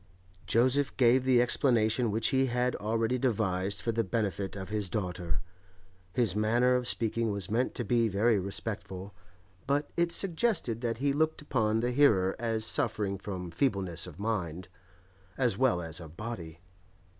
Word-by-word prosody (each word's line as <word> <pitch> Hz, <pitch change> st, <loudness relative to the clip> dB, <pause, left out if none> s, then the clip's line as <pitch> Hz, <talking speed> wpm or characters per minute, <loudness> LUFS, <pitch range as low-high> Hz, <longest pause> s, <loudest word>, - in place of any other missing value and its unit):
Joseph 130 Hz, +4 st, +2 dB
gave 125 Hz, 0 st, +4 dB
the 130 Hz, -2 st, +4 dB
explanation 120 Hz, -2 st, +2 dB
which 110 Hz, +2 st, +1 dB
he 135 Hz, 0 st, +2 dB
had 125 Hz, 0 st, 0 dB
already 115 Hz, +3 st, 0 dB
devised 100 Hz, -6 st, 0 dB
for 115 Hz, -, 0 dB
the 115 Hz, 0 st, 0 dB
benefit 100 Hz, -1 st, -2 dB
of 95 Hz, -2 st, -6 dB
his 105 Hz, -3 st, -2 dB
daughter. 90 Hz, -5 st, -3 dB, 0.7 s
His 110 Hz, -2 st, +1 dB
manner 120 Hz, +4 st, +3 dB
of 125 Hz, -1 st, 0 dB
speaking 115 Hz, -1 st, 0 dB
was 100 Hz, -2 st, -4 dB
meant 120 Hz, +4 st, 0 dB
to 120 Hz, -, -2 dB
be 115 Hz, +2 st, +2 dB
very 105 Hz, +2 st, +2 dB
respectful, 95 Hz, 0 st, -5 dB, 0.5 s
but 145 Hz, +1 st, 0 dB
it 170 Hz, 0 st, +1 dB
suggested 170 Hz, -, 0 dB
that 115 Hz, -2 st, -1 dB
he 140 Hz, +3 st, +1 dB
looked 155 Hz, +1 st, 0 dB
upon 110 Hz, -6 st, +1 dB
the 120 Hz, +1 st, 0 dB
hearer 110 Hz, -9 st, +3 dB
as 110 Hz, -1 st, -1 dB
suffering 100 Hz, -3 st, 0 dB
from 90 Hz, -3 st, -6 dB
feebleness 95 Hz, -, -1 dB
of 85 Hz, -3 st, -11 dB
mind, 95 Hz, -5 st, -3 dB, 0.7 s
as 125 Hz, -6 st, +2 dB
well 115 Hz, -7 st, +2 dB
as 80 Hz, 0 st, -4 dB
of 80 Hz, -1 st, -11 dB
body. 85 Hz, -8 st, -7 dB
110 Hz, 155 wpm, -30 LUFS, 95-125 Hz, 0.7 s, gave